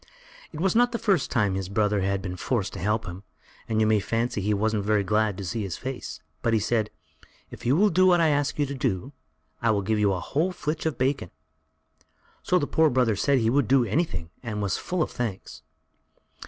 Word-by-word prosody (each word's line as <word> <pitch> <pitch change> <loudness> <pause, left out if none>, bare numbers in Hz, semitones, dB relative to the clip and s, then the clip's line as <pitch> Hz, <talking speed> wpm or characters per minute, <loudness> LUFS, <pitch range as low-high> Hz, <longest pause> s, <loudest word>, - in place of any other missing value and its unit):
It 155 - -8
was 190 +3 +1
not 245 +1 +4
the - - 0
first 195 -10 +1
time 105 -5 +1
his 95 -1 -3
brother 105 0 +1
had 95 0 -1
been 90 -1 -4
forced 105 0 -2
to - - -6
help 105 +5 0
him, 90 +1 -7 0.5
and 110 -1 +1
you 110 - +4
may 110 -1 +3
fancy 115 +1 -1
he 105 +2 0
wasn't 105 0 0
very 105 0 +2
glad 105 0 +1
to 100 - -5
see 110 +6 -3
his 95 -5 -4
face, 130 -1 -6 0.2
but 115 - +1
he 110 - +4
said: 110 0 0 0.6
"If - - -7
you 130 - +4
will 205 +4 +4
do 185 +2 +4
what 175 -1 +5
I 165 -1 +4
ask 145 0 0
you 145 - +2
to 140 - -5
do, 130 -1 -2 0.5
I'll 110 -4 +2
give 110 +2 0
you 105 -1 +3
a 95 - -1
whole 165 - -1
flitch 155 -1 -3
of 160 - -2
bacon." 130 -7 0 1.1
So 180 - +2
the 150 - +1
poor 160 +1 +3
brother 125 -5 +2
said 140 +6 +2
he 115 -2 +2
would 140 -3 +2
do 130 -2 +4
anything 100 - -2
and 110 -4 -4
was 100 -2 0
full 180 -3 -1
of - - -5
thanks. 115 -6 -5
115 Hz, 220 wpm, -26 LUFS, 100-145 Hz, 1.1 s, what